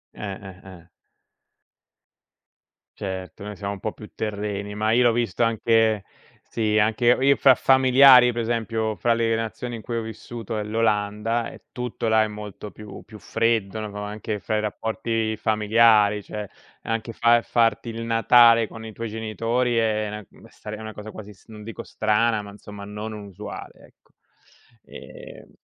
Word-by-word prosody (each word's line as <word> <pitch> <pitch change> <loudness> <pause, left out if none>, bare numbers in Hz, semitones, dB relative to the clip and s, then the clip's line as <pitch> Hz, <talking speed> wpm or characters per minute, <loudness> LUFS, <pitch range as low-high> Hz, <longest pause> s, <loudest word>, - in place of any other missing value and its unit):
Eh, 100 -2 -6 0.3
eh, - - -15 0.2
eh. 85 - -26 2.1
Certo, 95 0 -6
noi 105 0 -7
siamo 100 +1 -4
un 100 - -9
po' 110 - -3
più 105 - -13
terreni, 105 -1 -4
ma 110 +1 0
io 120 +2 +4
l'ho 120 - +5
visto 115 -3 -2
anche 115 -2 +2 0.4
sì, 110 -2 -1
anche 110 +3 +3
ho 130 - -4
io 140 0 +5
f - - -17
fra 135 -2 +7
familiari, 130 -1 +6
per 120 - -3
esempio, 110 -1 -1
fra 120 -1 +2
le 115 -1 +1
nazioni 115 +2 -4
in 110 - -9
cui 120 - -5
ho 115 - -2
vissuto 115 0 -6
è - - -2
l'Olanda, 110 +1 0
e - - -14
tutto 125 -2 -4
là 110 0 +4
è 110 - +2
molto 105 -1 -8
più 105 -1 -11
più 110 0 -13
freddo, 115 -2 -1
no? 105 -1 -6
Anche 105 0 -5
fra 110 +2 -2
i - - +1
rapporti 110 +1 -2
familiari, 105 -1 +3
cioè 105 +1 -7 0.4
anche 115 0 -3
fa 120 +1 +4
farti 115 0 +1
il 115 0 -5
Natale 115 0 +5
con 110 +1 -10
i 110 - -8
tuoi 115 +1 -5
genitori 115 +3 -1
è 110 -2 +1
na 105 0 -7
mh, - - -18
stare 105 0 -9
è 110 - -10
una 110 -1 -7
cosa 105 +1 -9
quasi, 105 -1 -10
mhmm, 95 - -19
non 105 - -10
dico 115 +1 -7
strana, 110 0 +1
ma 100 - -10
insomma 105 0 -11
non 105 +2 -6
usuale, 105 -1 -9
ecco, - - -32 0.7
ehm - - -12
110 Hz, 175 wpm, -24 LUFS, 105-115 Hz, 2.1 s, fra